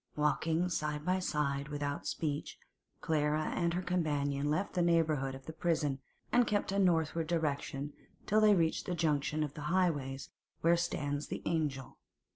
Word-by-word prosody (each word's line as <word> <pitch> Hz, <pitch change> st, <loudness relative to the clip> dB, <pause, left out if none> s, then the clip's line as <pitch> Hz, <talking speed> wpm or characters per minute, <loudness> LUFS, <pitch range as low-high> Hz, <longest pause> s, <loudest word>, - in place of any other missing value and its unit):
Walking 160 Hz, +3 st, +1 dB
side 150 Hz, -3 st, -2 dB
by 185 Hz, +1 st, +2 dB
side 140 Hz, -5 st, -1 dB
without 145 Hz, -1 st, -3 dB
speech, 145 Hz, -3 st, -3 dB, 0.4 s
Clara 155 Hz, 0 st, +1 dB
and 170 Hz, -1 st, 0 dB
her 180 Hz, -, -1 dB
companion 145 Hz, -5 st, 0 dB
left 185 Hz, +7 st, 0 dB
the 180 Hz, -, +1 dB
neighbourhood 155 Hz, -6 st, +2 dB
of 135 Hz, 0 st, -11 dB
the 160 Hz, -, -7 dB
prison, 155 Hz, -4 st, 0 dB, 0.3 s
and 245 Hz, -1 st, +4 dB
kept 205 Hz, -2 st, 0 dB
a 200 Hz, -, +1 dB
northward 165 Hz, -3 st, +2 dB
direction 145 Hz, -3 st, -2 dB, 0.3 s
till 215 Hz, +1 st, +3 dB
they 210 Hz, -1 st, +6 dB
reached 165 Hz, -3 st, +1 dB
the 180 Hz, -, -1 dB
junction 155 Hz, -1 st, +1 dB
of 145 Hz, 0 st, -5 dB
highways 150 Hz, -4 st, -1 dB, 0.3 s
where 170 Hz, +1 st, +5 dB
stands 145 Hz, -4 st, -2 dB
the -, -, -5 dB
'Angel. 145 Hz, -5 st, -2 dB
155 Hz, 155 wpm, -33 LUFS, 145-170 Hz, 0.4 s, they